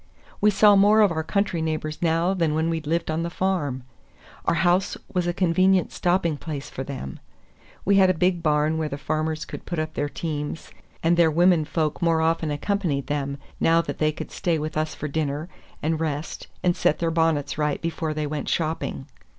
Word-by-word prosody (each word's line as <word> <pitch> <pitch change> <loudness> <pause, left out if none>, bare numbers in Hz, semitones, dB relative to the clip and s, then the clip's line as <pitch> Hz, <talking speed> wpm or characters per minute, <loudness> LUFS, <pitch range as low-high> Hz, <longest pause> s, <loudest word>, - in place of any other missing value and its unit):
We 210 - +6
saw 205 0 +6
more 205 +2 +6
of 205 -4 +5
our 160 -1 -1
country 190 0 -1
neighbors 155 -1 -3
now 170 +2 +2
than 165 -5 0
when 160 +1 +1
we 165 -1 -2
lived 160 +2 -1
on 160 +1 -1
the 170 - -2
farm. 170 -9 -1 0.6
Our - - +2
house 180 +3 +2 0.2
was 180 -2 0
a - - +2
convenient 185 +1 +2
stopping 175 -4 +1
place 145 -2 -6
for 135 - -5
them. 130 - -7 0.7
We 200 0 +4
had 190 -1 +6
a 185 - +2
big 180 +1 +1
barn 155 0 +1
where 155 -1 -1
the 140 - -4
farmers 155 +2 -2
could - - -9
put 175 - -3
up 155 0 -2
their 145 - -2
teams, 150 0 -5 0.3
and 170 +1 +3
their 170 -2 +5
women 170 0 +4
folk 155 0 -1
more 165 -1 +3
often 160 0 +1
accompanied 150 -2 -1
them, 140 -1 -2 0.2
now 165 0 +4
that - - -6
they 155 0 +2
could 155 - -8
stay 175 -4 0
with 155 0 -4
us 155 0 -1
for 150 - -4
dinner, 150 +2 -2 0.3
and 160 +1 0
rest 155 -1 -3 0.2
and 175 -1 +3
set 150 - +2
their 165 -1 0
bonnets 160 -3 0
right 150 -1 0
before 165 -2 -3
they 155 0 -1
went 150 -1 -3
shopping. 155 - -2
160 Hz, 200 wpm, -24 LUFS, 150-175 Hz, 0.7 s, We